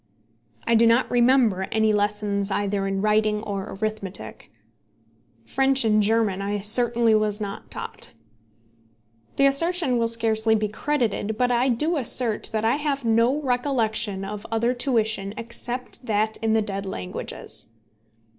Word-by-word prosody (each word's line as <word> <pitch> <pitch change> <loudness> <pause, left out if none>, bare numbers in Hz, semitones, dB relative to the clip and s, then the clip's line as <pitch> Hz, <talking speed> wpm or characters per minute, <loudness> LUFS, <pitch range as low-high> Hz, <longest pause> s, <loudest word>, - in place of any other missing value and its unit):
I 230 - +2
do 230 0 +5
not 230 +3 +3
remember 240 -6 +3
any 220 -1 +2
lessons 205 -1 0
either 200 0 -1
in 195 0 -2
writing 215 0 +2
or 200 -2 -5
arithmetic. 215 -4 -4 1.0
French 270 - +1
and 215 -1 +4
German 210 -2 +1
I 205 +1 -2
certainly 230 +2 +2
was 215 -1 +1
not 200 -2 -6
taught. - - -6 1.2
The 275 - +3
assertion 280 -2 +2
will 230 - +2
scarcely 225 -1 +2
be 215 -1 -1
credited, 220 -3 -1
but 250 +1 +1
I 245 +2 +2
do 305 +8 0
assert 240 -4 +1
that 220 0 -1
I 235 +5 +2
have 285 -3 -2
no 230 +5 +3
recollection 230 -6 -1
of 205 +1 -6
other 230 +2 +1
tuition 220 -5 -1
except 240 +3 -6
that 215 0 0
in 225 0 0
the 220 -1 +2
dead 195 -1 -4
languages. 90 - -6
220 Hz, 140 wpm, -24 LUFS, 210-245 Hz, 1.2 s, do